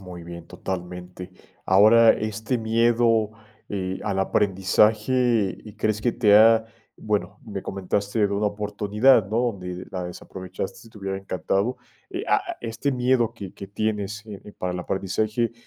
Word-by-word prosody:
Muy 90 -2 -9
bien, 85 -1 -9
totalmente. 90 0 -6 0.4
Ahora, 110 +4 +7
este 110 +3 -2
miedo, 115 -1 +2 0.4
eh, 95 -2 -3
al 100 -2 -1
aprendizaje, 105 +3 +2
¿y 105 -2 -11
crees 110 0 0
que 120 +2 +1
te 105 -4 +4
ha?, 110 +1 +6 0.3
bueno, 105 -1 -2
me 100 -4 -5
comentaste 100 +3 -2
de 100 - -4
una 100 +1 +1
oportunidad, 105 +3 +2
¿no?, 110 - 0
donde 90 -2 -7
la 90 -1 -4
desaprovechaste 95 +3 -7
y - - -21
te - - -17
hubiera 95 -1 -3
encantado. 100 +5 -1 0.3
Eh, - - -4
ah, - - 0
este 115 +4 -2
miedo 125 -2 +1
que 100 -4 -8
que 100 - -9
tienes, 105 +1 -3
eh, 105 -3 -9
eh, 105 - -11
para 90 0 -3
el 90 - -4
aprendizaje, 105 +6 -1
105 Hz, 155 wpm, -24 LUFS, 95-110 Hz, 0.4 s, Ahora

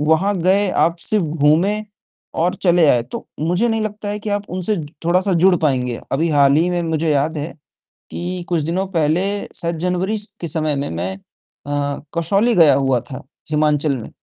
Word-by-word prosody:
वहाँ 160 +7 +2
गए, 190 +1 +3
आप 170 +1 +2
सिर्फ़ 210 -2 +2
घूमे 165 +8 +2 0.6
और 180 +2 +1
चले 175 -3 +5
आए 120 -3 +4
तो - - -6
मुझे 175 +9 +1
नहीं 225 -1 0
लगता 210 -1 -4
है 205 - -2
कि 210 0 -4
आप 205 0 -2
उनसे 185 +4 -1 0.3
थोड़ा-सा 185 +3 +2
जुड़ 190 0 +6
पाएँगे। 125 -5 0
अभी 160 +5 +1
हाल 140 -2 +4
ही 165 +3 +2
में 175 -1 0
मुझे 160 -1 -1
याद 150 +3 +1
है 150 +4 -4 0.6
कि 180 +1 -4
कुछ 170 -3 0
दिनों 175 +5 -1
पहले 160 +4 +2 0.3
शायद 170 0 -2
जनवरी 180 +5 -1 0.2
के 170 - -4
समय 155 -1 -1
में 140 +1 -2
मैं 90 +3 -3 0.5
अ, 145 0 -2 0.2
कसौली 200 +8 +2
गया 165 -4 +6
हुआ 135 -3 +1
था 130 +3 -9 0.3
हिमाचल 150 -1 +1
में, 115 - -8
165 Hz, 180 wpm, -19 LUFS, 150-190 Hz, 0.6 s, जुड़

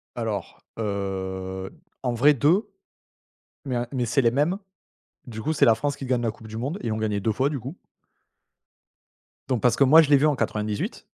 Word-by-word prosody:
Alors, 110 -6 -4 0.2
heu, 95 -2 -4 0.3
en 125 -2 0
vrai 145 +6 +5
2, 160 - +2 1.0
mais 130 -3 -2
un 120 0 -1
mais 125 -3 0
c'est 125 +4 +2
les 115 - +4
mêmes. 150 +9 +1 0.7
Du 110 -2 -7
coup 155 +7 -1
c'est - - +4
la 115 - +6
France 140 +5 -2
qui 135 - -7
gagne 125 -1 0
la 115 - 0
coupe 110 +1 -14
du 110 - -7
monde 140 - -3
et 115 - -2
ont 110 - -1
gagné 105 -2 -1
2 110 +3 0
fois 130 +6 +1
du 145 -2 -3
coup. 135 +10 -8 1.7
Donc 125 -4 0
parce 125 - +3
que 140 - +5
moi 160 +5 +8
je 150 - -2
l'ai 145 - +8
vu 150 - +3
en 150 -3 +2
98. 105 -2 -3
120 Hz, 205 wpm, -25 LUFS, 110-140 Hz, 1.7 s, moi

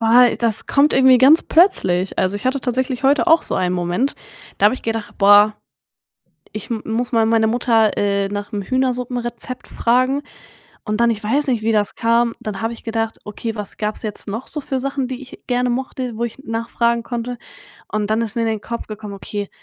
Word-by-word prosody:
Boah, 235 +2 +6
das 230 -3 0
kommt 285 +2 +3
irgendwie 260 -1 +6
ganz 280 +6 +6
plötzlich. 195 - +2
Also, 190 +2 +1
ich 205 - -5
hatte 260 +2 +1
tatsächlich 255 +1 -2
heute 280 +5 +3
auch 325 -1 +5
so - - -3
einen 180 -1 0
Moment, 180 +10 -1 0.4
da - - +1
habe 210 +5 +5
ich - - -10
gedacht: 225 -2 -4
„Boah, 205 +1 +6 1.0
ich 215 - -7
m 225 -2 -3
muss 235 +3 -2
mal 225 -1 +3
meine 220 0 +3
Mutter, 225 -2 +2
äh, 200 -1 0
nach’m 205 0 -4
Hühnersuppenrezept 250 0 -2
fragen 255 +4 +1 0.6
und 215 +2 -1
dann 235 - +4
ich 215 - -4
weiß 280 +7 +1
nicht, 240 -4 0
wie 225 0 +1
das 210 -1 0
kam, 230 0 +1
dann 210 -1 -5
habe 225 - -1
ich 235 - -11
gedacht: 225 0 -2
„Okay, 225 +2 -5
was 210 -2 -4
gab's 210 0 -3
jetzt 215 -1 -5
noch 225 +5 -5
so 300 - -5
für 265 -1 -3
Sachen, 270 -1 -2
die 255 0 -5
ich 260 - -13
gerne 250 0 0
mochte, 255 0 -3
wo 235 - -2
ich 235 +1 -4
nachfragen 235 -1 -1
konnte?“ 240 0 -4 0.5
Und 215 -1 -1
dann 220 +1 +1
ist 225 -1 -4
mir 230 - 0
in 225 - 0
den 220 -2 -2
Kopf 235 0 -6
gekommen: 215 -1 -7
„Okay, 205 +1 -5
230 Hz, 205 wpm, -19 LUFS, 215-250 Hz, 1.0 s, Boah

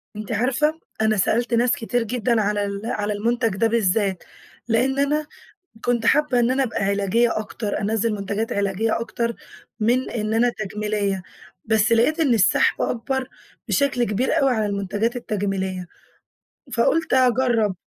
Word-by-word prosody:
أنتِ 215 +2 -6
عارفة، 270 +8 +1 0.2
أنا 215 -1 +2
سألت 235 +5 +1
ناس 240 +1 +3
كتير 245 -2 -1
جدًا 230 0 0
على 205 0 0
ال 200 0 -4
على 210 -2 -2
المنتج 230 +3 0
ده 225 +4 +2
بالذات، 200 -4 +1 0.4
لأن 255 +4 +1
أنا 295 +2 +1 0.6
كنت 240 -2 +1
حابة 290 -1 +3
إن 240 +1 +2
أنا 270 +1 +2
أبقى 225 -5 -2
علاجية 200 +4 +1
أكتر، 210 0 -4
أنَزِّل 220 +2 0
منتجات 205 +2 -3
علاجية 200 +3 0
أكتر 235 0 -2 0.4
من 240 +4 +1
إن 215 -1 -2
أنا 235 +2 +3
تجميلية، 210 -2 -2 0.4
بس 220 +1 +2
لقيت 235 +8 +3
إن 290 -6 +3
السحب 255 +7 +3
أكبر 255 +2 -2 0.4
بشكل 275 -4 +1
كبير 240 +8 0
أوي 275 -2 +3
على 220 -3 0
المنتجات 205 +4 -1
التجميلية، 195 -5 -3 0.9
فقُلت 315 +7 +1
أجَرّب. 245 -5 +2
225 Hz, 145 wpm, -22 LUFS, 205-245 Hz, 0.9 s, ناس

